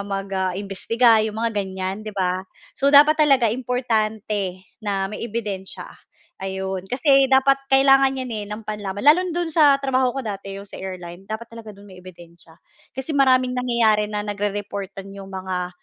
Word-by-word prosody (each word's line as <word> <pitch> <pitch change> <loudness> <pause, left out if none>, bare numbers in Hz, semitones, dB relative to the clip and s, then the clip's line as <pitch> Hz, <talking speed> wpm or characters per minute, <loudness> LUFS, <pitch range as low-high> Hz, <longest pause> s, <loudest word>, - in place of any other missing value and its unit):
mag-imbestiga 195 +4 +1
yung 215 0 -4
mga 230 0 -1
ganyan 190 +1 -4
'di 215 - -6
ba. 185 -1 0 0.4
So, 275 - +2
dapat 295 +2 +7
talaga 270 -6 +4
importante 220 -6 -2 0.2
na 200 -2 -1
may - - -6
ebidensiya, 205 -4 -5 0.6
ayun. 190 0 -4
Kasi 270 +2 +3
dapat 270 +1 +4
kailangan 270 0 +5
'yan, 255 -2 -5
eh, 210 -1 -4
nang 210 +1 -7
panlaban. 205 0 -5
Lalo 305 +5 +7
na - - -4
do'n 345 -2 -1
sa 295 -3 +5
trabaho 265 -2 0
ko 265 - -3
dati 195 -2 -6
yung 200 - -8
sa - - -10
airline, 185 0 -8
dapat 230 +2 -6
talaga 220 -3 -10
do'n 200 - -15
may 185 -2 -14
ebidensiya, 170 -2 -15 0.4
kasi 265 +4 -4
maraming 255 -2 +3
nangyayari 235 -4 +1
na 210 -1 -3
nagre-reportan 200 -1 -4
yung 195 -1 -10
mga, 185 -1 -4
210 Hz, 165 wpm, -22 LUFS, 195-255 Hz, 0.6 s, dapat